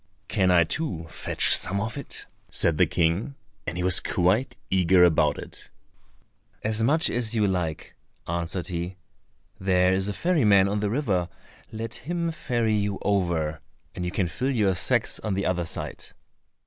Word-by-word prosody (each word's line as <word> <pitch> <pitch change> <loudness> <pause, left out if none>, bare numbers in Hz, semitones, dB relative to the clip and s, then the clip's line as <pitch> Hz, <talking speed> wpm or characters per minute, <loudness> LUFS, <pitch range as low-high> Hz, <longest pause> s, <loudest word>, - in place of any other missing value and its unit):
"Can 95 -3 +1
I 90 -2 +5
too 85 - -3
fetch - - +1
some 100 +2 -1
of 110 +3 -3
it?" 140 -2 -7 0.2
said 80 -3 +3
the - - +5
King; 85 - 0 0.3
and 90 -1 -3
he 90 - -2
was 90 0 +7
quite 95 +9 0
eager 95 -1 +4
about 85 -3 +3
it. - - -9 0.9
"As 110 +1 -1
much 155 +8 +3
as 120 -1 -1
you 105 -2 +2
like," 90 -5 -3 0.3
answered 85 +1 -3
he. 90 +1 -4 0.6
"There 90 -1 +3
is 95 +1 0
a 105 - -2
ferry 170 - +1
man 100 -2 +5
on 105 +1 -1
the 105 0 -1
river; 100 - 0 0.4
let 115 +1 -5
him 170 +3 -3
ferry 120 -8 -1
you 100 -2 0
over, 85 -6 0 0.3
and 90 - -5
you 90 - -1
can 95 0 -1
fill 125 +10 -2
your 105 -8 +2
sacks 115 +6 +2
on 105 -3 -2
the 100 - -1
other 90 -2 -1
side." - - -4
95 Hz, 170 wpm, -25 LUFS, 90-115 Hz, 0.9 s, was